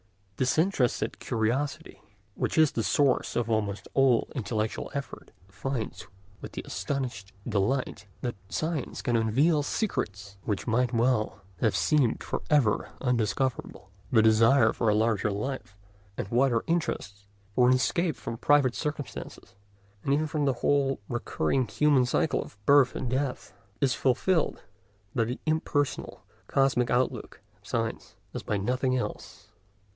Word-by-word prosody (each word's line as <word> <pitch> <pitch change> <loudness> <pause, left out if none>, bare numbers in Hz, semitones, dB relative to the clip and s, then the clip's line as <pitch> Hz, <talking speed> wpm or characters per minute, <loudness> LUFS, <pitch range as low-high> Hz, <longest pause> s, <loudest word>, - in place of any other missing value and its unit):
Disinterested 135 - +1
curiosity, 135 +7 -2 0.3
which - - -2
is 155 -2 +5
the 115 - -1
source 135 +4 +2
of 120 -2 0
almost 105 -2 -1
all 130 -4 +4
intellectual 110 -3 -2
effort, 140 -1 -6 0.2
finds 115 +4 -5 0.3
with - - -9
astonished 125 -8 -4 0.2
delight 110 +1 -1
that 120 -1 -2 0.2
science 160 -4 -3
can 120 - +1
unveil 135 +8 +3
secrets 100 - -3
which 105 -2 -2
might 125 +1 +1
well 115 -4 +1 0.2
have 110 - +2
seemed 145 -7 +2
for - - -3
ever 135 -9 +2
undiscoverable. 125 -3 -1 0.2
The 110 -3 +5
desire 115 +2 +5
for 115 - +1
a 105 - +3
larger 110 -1 +2
life 105 -1 -4 0.4
and - - -3
wider 120 -1 +2
interests, 100 - -2 0.3
for 125 +3 +4
an 130 - +6
escape 165 +4 +1
from 115 - -6
private 145 -4 +4
circumstances, 150 -2 -6 0.5
and 140 - 0
even 155 +2 +1
from 150 -1 -1
the 135 - +2
whole 140 -1 +2
recurring 120 - -1
human 135 +2 +3
cycle - - +1
of - - -15
birth 140 -1 +5
and 125 - -3
death, 130 -3 -2 0.3
is 135 -2 +2
fulfilled 155 +6 +1 0.5
by 115 -3 +1
the 125 +3 -4
impersonal 155 -3 -1 0.2
cosmic 130 -3 +2
outlook 125 +1 -1 0.2
of - - -19
science - - -3 0.2
as - - -4
by 105 - -1
nothing 125 +5 0
else. 125 - -6
125 Hz, 135 wpm, -28 LUFS, 110-140 Hz, 0.5 s, an